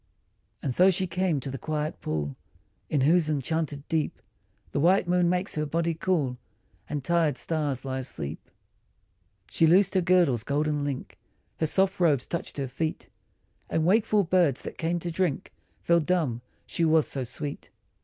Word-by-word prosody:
And 130 - -1
so 185 +8 +5
she 190 0 +1
came 180 -3 0
to 135 - -5
the 135 - -6
quiet 155 0 -3
pool 75 -3 -3 0.5
In 145 - +1
whose 160 +3 +3
enchanted 150 0 -2
deep 160 -2 -1 0.5
The - - -1
white 180 +4 +4
moon 175 -1 +3
makes 180 +2 0
her 150 0 -1
body 165 +2 0
cool 155 -7 -1 0.5
And 145 -2 -3
tired 165 -3 +2
stars 145 -2 -2
lie 130 0 -2
asleep. 80 - -6 1.0
She 165 - +3
loosed 185 +4 +4
her 190 - +3
girdle's 175 - +3
golden 145 +1 0
link, 140 -2 -5 0.4
Her 160 - +1
soft 190 +3 +1
robes 150 -8 +3
touched 170 - -5
her 135 -2 -2
feet, 155 +5 -4 0.6
And 160 - +1
wakeful 210 +2 +3
birds 170 -6 +2
that - - -8
came 165 +2 0
to 175 0 -4
drink 170 -4 -1 0.3
Fell 170 0 +4
dumb 155 -8 0 0.2
she 170 - -2
was 160 -1 +4
so 135 - -3
sweet. 140 +4 -6
160 Hz, 165 wpm, -27 LUFS, 140-175 Hz, 1.0 s, so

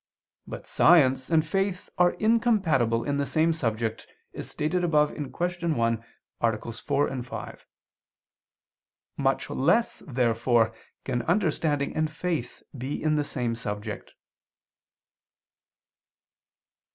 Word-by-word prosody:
But - - -7
science 135 -6 +4
and 160 -2 +3
faith 195 +2 -1
are 175 0 +5
incompatible 195 - +2
in 145 -1 -1
the 140 - 0
same 160 +1 +2
subject, 115 -6 -2 0.3
as - - -7
stated 165 +4 -1
above 150 -3 +3
(Q. 150 - -4 0.5
1, 115 -1 0 0.4
AA. 115 0 0
4, 140 +2 -1
5). 125 - -8 1.5
Much 135 -1 +1
less, 225 - +2
therefore, 120 -3 +2 0.3
can 120 -2 -1
understanding 155 - 0
and 155 0 +1
faith 155 -5 -4
be 130 +2 -4
in 155 -1 +2
the 150 - +1
same 125 -4 -2
subject. 105 -2 -5
140 Hz, 105 wpm, -27 LUFS, 120-160 Hz, 1.5 s, are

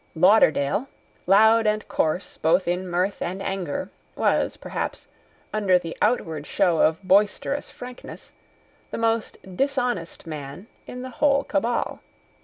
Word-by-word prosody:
Lauderdale, 185 - +4 0.4
loud 220 +3 +5
and 215 0 0
coarse 160 +4 -1
both 165 +4 +2
in 180 +2 -1
mirth 180 +3 -1
and 185 +3 -3
anger, 190 -1 -3 0.2
was, - - +1
perhaps, - - -5 0.5
under 200 -4 +3
the 165 -2 -6
outward 160 -11 0
show 170 -3 +2
of 160 +4 +2
boisterous 205 +9 +2
frankness, 250 0 -10 0.6
the - - -5
most 230 -1 0 0.2
dishonest 250 -9 -1
man 150 +2 -7 0.2
in 250 0 -7
the 260 - -7
whole 280 +2 +2
Cabal. 230 +4 -1
195 Hz, 125 wpm, -24 LUFS, 170-230 Hz, 0.6 s, loud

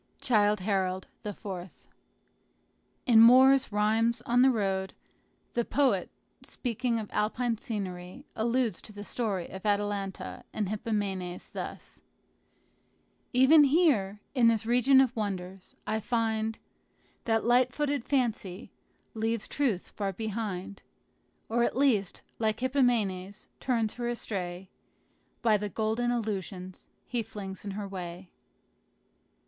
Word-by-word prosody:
Childe 210 -4 +2
Harold, 190 -1 0 0.2
IV. 205 -1 -7 1.6
In 235 -4 +6
Moore's 260 +2 +7
"Rhymes 225 +3 +1
on 240 +1 +3
the 265 - +7
Road," 195 -5 -1 0.6
the 235 - +1
poet, 275 +2 +1 0.3
speaking 240 -1 -2
of 215 -2 -4
Alpine 230 +1 0
scenery, 190 +2 -5
alludes 235 +1 0
to - - -10
the 205 0 -8
story 205 -5 -2
of 190 0 -9
Atalanta 205 -2 -2
and 210 -3 -2
Hippomenes 200 -4 -3
thus: - - -7 1.3
"Even 275 +5 +7
here, 265 - +2
in 245 -4 +4
this 225 -1 +2
region 250 +3 +5
of 255 -2 +1
wonders, 190 -3 -5
I 215 +1 -1
find 225 -1 -1 0.7
That 225 -1 +1
light 250 +1 +4
footed 290 -3 -1
Fancy 230 -7 -1 0.4
leaves 225 -1 -1
Truth 245 -11 -1
far 200 -2 -3
behind, 200 -2 -4 0.7
Or 235 +1 +1
at 240 - 0
least, 230 -9 +1 0.2
like 220 0 0
Hippomenes, 215 -7 0
turns 230 -4 0
her 240 -1 -4
astray 190 -6 -4 0.8
By 220 -3 +4
the 205 0 -4
golden 220 +4 -1
illusions 195 -5 -4 0.2
he 240 -2 -2
flings 200 -3 -7
in 205 - -5
her 205 -1 -4
way." 180 -1 -7
220 Hz, 120 wpm, -29 LUFS, 195-240 Hz, 1.6 s, Moore's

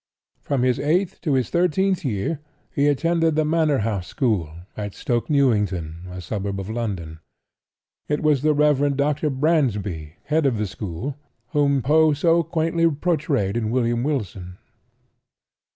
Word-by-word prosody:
From 135 -3 -1
his 125 -1 +2
eighth 175 +6 0
to 155 -6 0
his 130 -2 0
thirteenth 180 +2 +1
year 130 +4 -2 0.3
he 140 0 +2
attended 165 +2 +2
the 155 0 +2
Manor 155 -2 +2
House 100 -6 -2
school, 110 - 0 0.3
at 105 -2 -5
Stoke 120 +3 -1
Newington, 100 - +1
a 90 0 -7
suburb 100 +1 -3
of 95 +2 -5
London. 95 -9 -4 0.9
It 150 +1 -1
was 150 -4 +3
the 155 0 +2
Rev. 145 -1 +3
Dr. 150 +2 +1
Bransby, 105 - 0
head 155 -1 +1
of 125 -4 0
the 105 - -1
school, 105 - -5 0.3
whom 140 -3 +2
Poe 155 +2 +4
so 165 +3 +3
quaintly 165 +1 +1
portrayed 145 - 0
in 115 -2 -1
"William 120 -1 +1
Wilson." 100 - -3
140 Hz, 145 wpm, -23 LUFS, 105-155 Hz, 0.9 s, Poe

